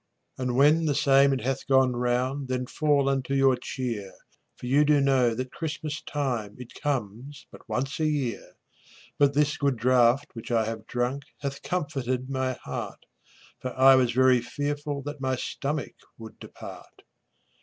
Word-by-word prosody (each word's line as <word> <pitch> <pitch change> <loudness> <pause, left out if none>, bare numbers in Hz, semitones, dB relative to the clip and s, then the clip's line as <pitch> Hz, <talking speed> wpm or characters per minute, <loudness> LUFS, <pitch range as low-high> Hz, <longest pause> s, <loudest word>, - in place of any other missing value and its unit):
And 125 -1 -1
when 150 +5 +4
the 145 -2 +1
same 140 -1 +5
it 135 - -1
hath 135 +1 -3
gone 130 -2 +4
round 125 +3 -1
Then 125 0 -2
fall 145 0 +1
unto 135 0 0
your 135 -1 +4
cheer, 120 -6 -5 0.5
For - - -9
you 140 +4 +4
do 150 -1 +4
know 130 -4 +3
that 130 +2 -4
Christmas 155 -2 -4
time 120 -8 -3
It 125 -2 -11
comes 135 0 -4
but - - -15
once 135 +5 -2
a 155 - +2
year. 140 -7 -2 0.7
But 140 -1 +4
this 150 0 +2
good 140 -3 0
draught 125 +3 +3
which 115 - -9
I 115 -2 +2
have 110 0 -6
drunk 125 +3 -2 0.2
Hath 140 -1 -4
comforted 135 -6 -2
my 130 -1 -1
heart, - - -6 0.5
For 130 0 -6
I 135 +1 +8
was 130 -2 +3
very 130 0 +4
fearful 145 +3 -3
that 145 0 -7
My 130 -1 0
stomach 145 +2 -4 0.2
would 110 -1 -11
depart. - - -12
130 Hz, 165 wpm, -26 LUFS, 125-145 Hz, 0.7 s, I